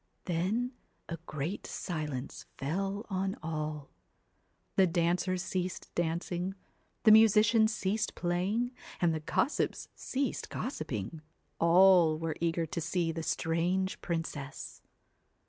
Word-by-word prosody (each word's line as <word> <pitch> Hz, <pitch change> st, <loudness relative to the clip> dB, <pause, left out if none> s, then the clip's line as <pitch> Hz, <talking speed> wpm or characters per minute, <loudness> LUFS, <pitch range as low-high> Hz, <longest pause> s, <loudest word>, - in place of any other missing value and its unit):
Then 195 Hz, +9 st, 0 dB, 0.4 s
a 170 Hz, -, -3 dB
great 155 Hz, +6 st, -4 dB
silence 150 Hz, -6 st, -4 dB
fell 195 Hz, +8 st, -2 dB
on 190 Hz, +1 st, 0 dB
all. 155 Hz, -2 st, -4 dB, 0.8 s
The 190 Hz, -1 st, +5 dB
dancers 180 Hz, +2 st, +1 dB
ceased 185 Hz, -1 st, -3 dB
dancing, 175 Hz, +2 st, -1 dB, 0.5 s
the 220 Hz, -, +8 dB
musicians 220 Hz, +1 st, +6 dB
ceased 210 Hz, 0 st, -1 dB
playing, 190 Hz, +8 st, 0 dB, 0.3 s
and 170 Hz, -2 st, +3 dB
the 160 Hz, -, -1 dB
gossips 240 Hz, -, 0 dB
ceased 270 Hz, -1 st, -2 dB
gossiping, 155 Hz, -, -4 dB, 0.4 s
all 170 Hz, -1 st, +6 dB
were 160 Hz, -1 st, -2 dB
eager 170 Hz, 0 st, +1 dB
to 165 Hz, +2 st, -4 dB
see 165 Hz, +1 st, 0 dB
the 165 Hz, 0 st, -4 dB
strange 175 Hz, +4 st, 0 dB
princess. 160 Hz, -5 st, -4 dB
175 Hz, 110 wpm, -31 LUFS, 160-195 Hz, 0.8 s, the